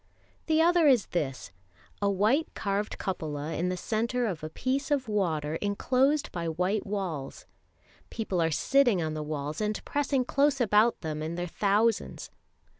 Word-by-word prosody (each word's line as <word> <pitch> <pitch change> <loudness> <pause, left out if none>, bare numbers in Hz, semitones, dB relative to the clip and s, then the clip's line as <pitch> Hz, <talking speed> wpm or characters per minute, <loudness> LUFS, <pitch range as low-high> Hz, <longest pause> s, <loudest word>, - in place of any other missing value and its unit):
The 320 0 +4
other 340 -3 +5 0.2
this: 135 - -3 0.5
a 200 - +2
white 215 - +2
carved 200 0 -2
cupola 155 -4 -4
in 175 +4 -1
the 180 - -2
centre 235 +5 -1
of 180 -8 -3
a 155 - -4
piece 265 - -2
of 280 -4 0
water 160 -7 -1
enclosed 255 - +1
by 170 -2 -3
white 180 +6 -1
walls. 180 -9 -4 0.6
People 200 -6 -2
are 165 - +2
sitting 240 - +3
on 160 -2 -2
the 155 - -3
walls 150 +2 -4
and 210 0 -1
pressing 280 -3 0
close 280 +1 +2
about 225 0 +3
them 155 -2 -4
in 160 +2 -3
their 175 0 -2
thousands. 205 +5 0
200 Hz, 155 wpm, -28 LUFS, 160-250 Hz, 0.6 s, other